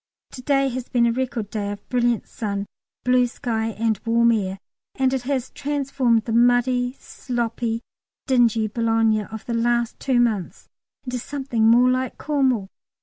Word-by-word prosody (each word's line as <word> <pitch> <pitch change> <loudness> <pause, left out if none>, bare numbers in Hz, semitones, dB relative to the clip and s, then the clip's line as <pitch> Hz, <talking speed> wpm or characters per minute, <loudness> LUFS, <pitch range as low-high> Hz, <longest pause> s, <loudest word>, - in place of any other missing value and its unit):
To 255 - -9
day 275 +1 +2
has 255 0 -5
been 240 -2 +3
a 235 - +3
record 235 -4 -3
day 205 -2 -2
of 205 0 -9
brilliant 240 -2 +1
sun, 200 -2 -4 0.4
blue 250 0 +3
sky 225 -2 -2
and 225 -1 -1
warm 235 0 +3
air, 195 -4 -1 0.4
and 265 0 +1
it 265 - 0
has 265 -3 -1
transformed 275 -5 0
the 230 - -3
muddy, 245 +1 +3
sloppy, 235 -2 -3 0.4
dingy 235 -4 +3
Boulogne 225 -1 +1
of 220 +1 -9
the 235 - -3
last 235 0 0
two 260 -3 +1
months 220 -7 -1 0.3
into 250 -1 -4
something 255 -4 -1
more 240 +2 +6
like 255 -1 -2
Cornwall. 260 -9 0
235 Hz, 155 wpm, -23 LUFS, 225-255 Hz, 0.4 s, more